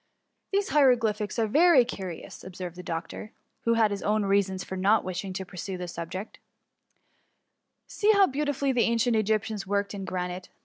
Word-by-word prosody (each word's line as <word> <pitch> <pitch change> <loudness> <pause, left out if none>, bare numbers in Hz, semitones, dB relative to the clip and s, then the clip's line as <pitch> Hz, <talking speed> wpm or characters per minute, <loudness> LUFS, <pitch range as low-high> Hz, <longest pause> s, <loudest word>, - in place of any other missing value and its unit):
" - - -52
These 400 0 +1
hieroglyphics 230 -8 +2
are 225 - +2
very 295 +2 +5
curious, 190 -7 -7
ob 185 -1 -10
served 180 -2 -6
the 180 - -8
doctor, 170 +5 -6 0.3
who 230 0 +3
had 220 -2 +3
his 200 - -3
own 210 0 +1
reasons 195 -1 +1
for 190 - -6
not 200 +4 +3
wishing 185 +1 -4
to 190 0 -4
pursue 185 +1 -6
the 180 0 -5
subject; 175 +4 -7 0.8
" - - -48
see 425 +1 +2
how 400 -2 +6
beautifully 285 -2 -1
the 250 -2 +2
ancient 230 +1 +2
Egyptians 215 -1 0
worked 200 +1 -1
in 200 -1 -5
granite. 180 -1 -4
205 Hz, 180 wpm, -27 LUFS, 185-235 Hz, 0.8 s, how